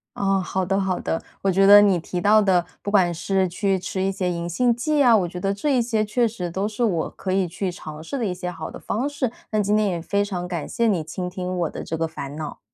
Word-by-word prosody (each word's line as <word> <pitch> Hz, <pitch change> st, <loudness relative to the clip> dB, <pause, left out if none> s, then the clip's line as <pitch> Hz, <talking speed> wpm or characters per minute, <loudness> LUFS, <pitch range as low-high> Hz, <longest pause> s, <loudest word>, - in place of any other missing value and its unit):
哦， 195 Hz, -1 st, +1 dB
好 190 Hz, +1 st, -1 dB
的 195 Hz, +2 st, +1 dB
好 190 Hz, -2 st, -1 dB
的。 165 Hz, -, -2 dB, 0.2 s
我 195 Hz, -, +3 dB
觉 195 Hz, +2 st, +4 dB
得 205 Hz, +1 st, +10 dB
你 195 Hz, -4 st, +4 dB
提 175 Hz, +2 st, -4 dB
到 210 Hz, +4 st, +5 dB
的， 185 Hz, -4 st, +3 dB, 0.2 s
不 -, -, -4 dB
管 185 Hz, -4 st, +4 dB
是 190 Hz, +3 st, 0 dB
去 195 Hz, +2 st, 0 dB
吃 190 Hz, +1 st, -4 dB
一 195 Hz, -, +1 dB
些 190 Hz, -2 st, -2 dB
银 170 Hz, 0 st, -3 dB
杏 235 Hz, +7 st, +2 dB
剂 295 Hz, +5 st, +1 dB
啊， 240 Hz, -3 st, +6 dB
我 190 Hz, -5 st, +2 dB
觉 180 Hz, +1 st, -7 dB
得 195 Hz, +2 st, 0 dB
这 265 Hz, +7 st, 0 dB
一 -, -, +3 dB
些 225 Hz, -2 st, 0 dB
确 235 Hz, +3 st, +1 dB
实 185 Hz, -6 st, -4 dB
都 195 Hz, +4 st, -1 dB
是 215 Hz, +3 st, -3 dB
我 175 Hz, -8 st, 0 dB
可 190 Hz, -, -5 dB
以 190 Hz, -1 st, +1 dB
去 180 Hz, +2 st, -3 dB
尝 155 Hz, -3 st, -9 dB
试 275 Hz, -, -4 dB
的 240 Hz, -, -1 dB
一 190 Hz, -, -1 dB
些 180 Hz, 0 st, -5 dB
好 160 Hz, -2 st, -7 dB
的 -, -, -9 dB
方 245 Hz, +7 st, -2 dB
式， 285 Hz, -5 st, -2 dB, 0.2 s
那 215 Hz, -1 st, +2 dB
今 205 Hz, +1 st, +2 dB
天 215 Hz, -1 st, +2 dB
也 175 Hz, -2 st, -2 dB
非 200 Hz, +4 st, 0 dB
常 180 Hz, -3 st, -4 dB
感 175 Hz, -3 st, -4 dB
谢 235 Hz, -1 st, 0 dB
你 185 Hz, -7 st, +1 dB
倾 180 Hz, +3 st, -5 dB
听 185 Hz, 0 st, -4 dB
我 170 Hz, -3 st, 0 dB
的 -, -, -7 dB
这 160 Hz, -, -4 dB
个 165 Hz, 0 st, 0 dB
烦 145 Hz, -3 st, -7 dB
恼。 155 Hz, -1 st, -6 dB
190 Hz, 295 characters per minute, -23 LUFS, 175-210 Hz, 0.2 s, 得